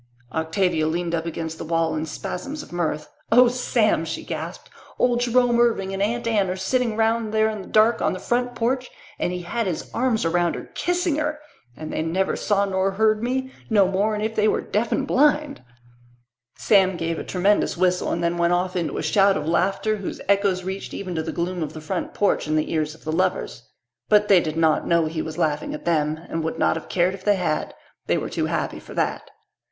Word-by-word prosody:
Octavia 160 0 +1
leaned 170 +1 -2
up 165 0 -1
against 160 -1 -5
the - - -4
wall 165 0 0
in 155 +1 -3
spasms 275 - -5
of - - -15
mirth. 160 -3 -2 0.2
"Oh, 250 +2 +7
Sam," 235 -6 +1
she 160 0 -5
gasped, 165 +2 -6 0.3
"old 245 -1 +2
Jerome 245 0 +3
Irving 210 -5 +2
and 195 - -3
Aunt 230 +4 0
Anne 210 -5 +1
are 185 - -1
sitting 220 +4 0
round 225 0 +1
there 220 0 +3
in 215 -2 -5
the - - -11
dark 220 +2 +3
on - - +1
the 185 - -5
front 245 +3 -1
porch 255 +2 -1 0.3
and - - 0
he 180 0 -4
had 225 +5 -2
his 175 - -4
arms 235 -5 +1
around 175 +1 +1
her, - - -8
kissing 355 -3 0
her! 300 0 -1 0.4
And 155 0 -6
they - - -1
never 175 +4 0
saw 200 -1 +1
nor 190 0 0
heard 215 +1 +2
me, 260 +2 -2 0.2
no 205 -4 +4
more'n 210 +3 0
if 220 +1 -1
they 215 -1 +2
were - - +2
deaf 220 +2 -1
and 275 - +1
blind!" 295 - +2 0.9
Sam 190 -3 +3
gave 165 0 -2
a - - -4
tremendous 195 0 +1
whistle 180 0 +1
and 170 - -1
then 170 0 0
went 170 +1 +3
off 180 +1 0
into 170 -3 -2
a - - -2
shout 195 -1 +4
of 150 - -4
laughter 195 +6 +1
whose 195 - -5
echoes 200 -2 +2
reached 190 +1 -5
even 185 -2 -5
to 160 - -1
the 160 - -4
gloom 175 +1 -3
of 155 - -3
the 155 - -7
front 170 +3 -4
porch 205 -6 +1
and 155 0 +1
the 155 - -1
ears 155 -1 -1
of - - -20
the 155 - -3
lovers. 175 -8 -1 0.4
But 210 0 +4
they 195 -3 +7
did 160 -2 -3
not 160 -1 +2
know 170 -1 +3
he 155 0 -3
was 160 -1 -6
laughing 150 -1 -1
at - - -10
them 155 -2 +1
and 165 - -3
would 160 - -3
not - - +2
have 165 - -7
cared 180 +1 +2
if 190 -1 -9
they 205 0 +3
had. 165 -5 -2 0.3
They - - +2
were - - -4
too - - -1
happy - - -2
for - - -12
that. - - -1
190 Hz, 220 wpm, -23 LUFS, 165-220 Hz, 0.9 s, Oh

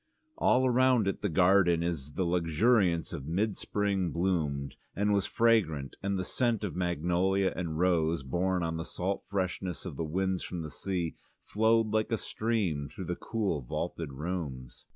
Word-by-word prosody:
All 130 +1 +4
round 125 -3 +4
it 100 - -2
the 105 - 0
garden 90 0 +4
in 85 0 0 0.2
the 95 - 0
luxuriance 85 +2 +2
of 70 - -6
mid 100 +6 0
spring 100 -3 -1
bloomed 80 -6 -1 0.2
and 105 +1 +2
was 100 -1 +1
fragrant, 90 -13 +2
and 100 0 -1
the 95 - -2
scent 120 -2 0
of 100 - -3
magnolia 90 +2 +1
and 85 -3 -3
rose, 85 -3 +2
borne 90 +7 0
on 80 0 -2
the 80 - -3
salt 95 +3 -3
freshness 95 -2 -2
of 70 - -6
the - - -1
winds 95 +4 -1
from 85 -2 -5
the 75 - -6
sea, 90 -4 -2 0.3
flowed 110 +1 +2
like 110 +1 0
a 115 - +2
stream 100 -13 -1
through - - -7
the - - -2
cool 100 -10 -2
vaulted 70 +4 -4
rooms. 70 -4 -5
90 Hz, 170 wpm, -30 LUFS, 80-100 Hz, 0.3 s, All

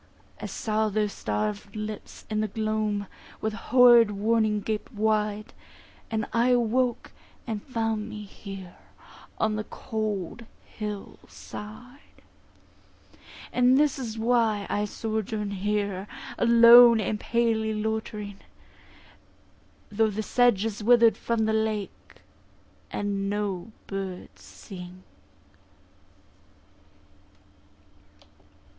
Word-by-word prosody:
I - - -4
saw 215 0 -1
their 210 +1 +1
starved 105 - -3
lips 215 -1 -7
in 215 0 -1
the 215 - 0
gloam 215 -1 -1 0.3
With 220 0 -2
horrid 240 -1 +6
warning 215 +1 +1
gaped 215 0 -3
wide, 215 -1 -1 0.6
And 220 -1 -1
I 235 +2 +3
awoke, 245 0 +1 0.3
and 220 -3 -4
found 225 -3 -2
me 210 -1 -7
here 195 -2 -10 0.6
On 215 -1 +1
the 215 - -2
cold 215 -1 -4 0.2
hill 210 -2 -7
side. 245 +6 -11 1.3
And 250 +1 +4
this 290 -1 +2
is 230 -4 -5
why 225 -3 +2
I 205 - 0
sojourn 215 -1 -3
here, 200 -1 -2 0.3
Alone 235 0 +8
and 210 0 -1
palely 225 -1 +1
loitering; 215 -2 -4 1.5
Though 220 +1 +2
the 215 +1 -3
sedge 240 -3 +3
is 215 -1 -4
wither'd 230 -1 +6
from 225 0 -1
the 220 - +1
lake, 220 -2 -3 0.7
And 200 -1 -2
no 205 -1 -3
birds 195 -2 -6
sing. 185 -1 -11
215 Hz, 100 wpm, -26 LUFS, 205-230 Hz, 1.5 s, Alone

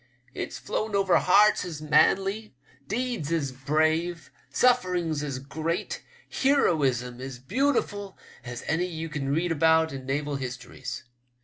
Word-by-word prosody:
It's - - -5
flown 215 -1 -3
over 195 -2 +4
hearts 210 +3 +5
as 170 -4 -6
manly, 195 +6 +2 0.3
deeds 235 - -2
as 150 -5 0
brave, 160 +5 0 0.2
sufferings 180 -11 +2
as 140 -3 -3
great, 160 - -3 0.3
heroism 135 - +1
as 130 -1 -6
beautiful 205 - -1 0.3
as 120 -1 -7
any 170 +4 0
ye 165 -2 -5
can 145 -3 -3
read 165 +5 +1
about 160 0 +3
in 135 -1 -7
naval 145 +1 -1
histories. 125 -1 -6
160 Hz, 125 wpm, -27 LUFS, 135-195 Hz, 0.3 s, hearts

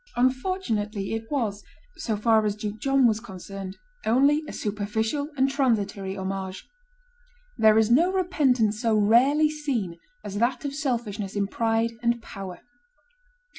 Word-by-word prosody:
Unfortunately, 245 - 0
it 225 0 -4
was, 220 -8 -2 0.3
so 220 -3 -2
far 220 0 +3
as 210 -1 0
Duke 210 0 -5
John 270 0 +3
was 220 -2 +3
concerned, 195 -2 -8 0.3
only 280 +7 +3
a - - -6
superficial 220 +7 -2
and 265 +1 +4
transitory 210 -8 0
homage. 190 0 -5 0.9
There 220 0 +6
is 220 0 +3
no 335 +9 +5
repentance 265 - +1
so 225 -3 +2
rarely 265 +9 +4
seen 245 - -3 0.2
as 205 0 -4
that 245 +3 0
of 280 - -3
selfishness 230 -8 -3
in 200 -1 +1
pride 225 +2 0
and 235 0 +1
power. 195 -5 -8
225 Hz, 135 wpm, -26 LUFS, 205-265 Hz, 0.9 s, There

